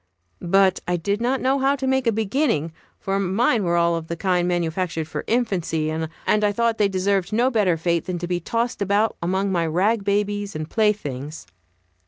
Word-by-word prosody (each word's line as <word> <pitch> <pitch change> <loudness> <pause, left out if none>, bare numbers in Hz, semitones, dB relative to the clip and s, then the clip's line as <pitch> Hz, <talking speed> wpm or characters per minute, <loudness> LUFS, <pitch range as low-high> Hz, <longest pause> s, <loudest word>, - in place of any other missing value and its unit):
But 190 +1 +3
I 180 - +1
did 200 +6 -2
not 255 +3 0
know 265 +2 +2
how 270 +1 +2
to 265 -1 -4
make 265 -1 +1
a - - +5
beginning, 215 - 0 0.3
for 195 0 -1
mine 205 +4 +1
were 170 -1 +1
all 170 0 +2
of 165 -1 -5
the 170 - -3
kind 180 0 0
manufactured 170 -2 -1
for - - -5
infancy, 180 -10 0
and 160 0 -3 0.2
I 210 -1 +2
thought 230 +2 0
they 205 -1 +3
deserved 195 0 0
no 240 +4 +2
better 200 -8 +2
fate 170 0 0
than 180 -1 -3
to 175 0 -4
be 175 0 -1
tossed 230 +6 -2
about 200 +2 +1
among 190 +3 0
my 170 -3 +1
rag 195 +7 +1
babies 205 -1 -1
and 155 0 -4
playthings. 155 - -1
195 Hz, 195 wpm, -22 LUFS, 170-220 Hz, 0.3 s, a